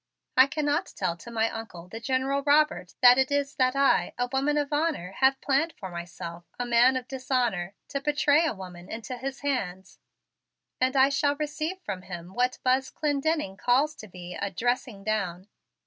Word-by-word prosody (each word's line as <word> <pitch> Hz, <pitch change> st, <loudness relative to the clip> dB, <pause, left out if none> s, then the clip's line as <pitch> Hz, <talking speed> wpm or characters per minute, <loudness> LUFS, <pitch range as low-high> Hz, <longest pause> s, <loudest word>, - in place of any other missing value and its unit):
I 260 Hz, +1 st, +7 dB
cannot 295 Hz, 0 st, 0 dB
tell 180 Hz, -3 st, -1 dB
to 205 Hz, -, -11 dB
my 225 Hz, -1 st, +1 dB
Uncle, 200 Hz, -6 st, -8 dB
the 225 Hz, +5 st, -7 dB
General 265 Hz, +3 st, 0 dB
Robert, 290 Hz, -8 st, +2 dB
that 250 Hz, +1 st, +9 dB
it 265 Hz, -, +3 dB
is 285 Hz, 0 st, 0 dB
that 255 Hz, 0 st, +2 dB
I, 275 Hz, 0 st, +3 dB
a 245 Hz, -, 0 dB
woman 280 Hz, +3 st, +1 dB
of 295 Hz, 0 st, -1 dB
honor, 295 Hz, -, 0 dB
have 265 Hz, 0 st, +4 dB
planned 290 Hz, +4 st, +1 dB
for 190 Hz, -2 st, -7 dB
myself, 170 Hz, 0 st, -7 dB
a 245 Hz, -, -2 dB
man 240 Hz, +2 st, +5 dB
of 255 Hz, -1 st, -3 dB
dishonor, 245 Hz, -8 st, -1 dB
to 275 Hz, -1 st, -3 dB
betray 295 Hz, +1 st, +3 dB
a 310 Hz, -, -2 dB
woman 180 Hz, -2 st, -10 dB
into 230 Hz, +3 st, -5 dB
his 265 Hz, +2 st, -6 dB
hands, 200 Hz, -10 st, -3 dB, 0.8 s
and 255 Hz, +1 st, +1 dB
I 270 Hz, 0 st, +6 dB
shall 285 Hz, +1 st, +1 dB
receive 305 Hz, +4 st, -3 dB
from 195 Hz, -, -5 dB
him 175 Hz, -1 st, -8 dB
what 250 Hz, +2 st, +1 dB
that -, -, -16 dB
Buzz 260 Hz, +1 st, +2 dB
Clendenning 295 Hz, -8 st, -1 dB
calls 275 Hz, +5 st, +2 dB
to 215 Hz, -, -10 dB
be 180 Hz, -1 st, -9 dB
a 200 Hz, -, -3 dB
'dressing 230 Hz, +1 st, -2 dB
down.' 195 Hz, -3 st, -2 dB
255 Hz, 185 wpm, -27 LUFS, 195-280 Hz, 0.8 s, that